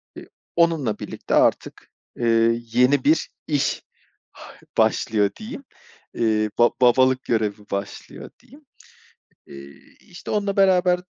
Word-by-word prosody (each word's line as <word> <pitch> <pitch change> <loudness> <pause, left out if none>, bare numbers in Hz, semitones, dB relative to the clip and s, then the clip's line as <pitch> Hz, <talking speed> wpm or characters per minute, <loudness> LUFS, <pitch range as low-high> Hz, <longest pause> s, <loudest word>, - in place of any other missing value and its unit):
eee, - - -12 0.3
onunla 160 -10 +1
birlikte - - -4
artık, - - 0 0.2
eee, 115 0 +1
yeni 125 +4 +2
bir 155 +3 +2 0.2
iş 145 -3 -1 0.9
başlıyor 105 -2 +1
diyeyim. 265 +6 -9 0.5
Eee, 110 -2 0
ba 120 - +6
babalık 130 +1 +3
görevi 110 -3 -1
başlıyor 100 0 -6
diyeyim. 285 +4 -19 0.8
Eee, 70 0 -13 0.2
işte 175 - -11
onunla 200 -1 -1
beraber 180 -2 +3
125 Hz, 110 wpm, -22 LUFS, 110-175 Hz, 0.9 s, ba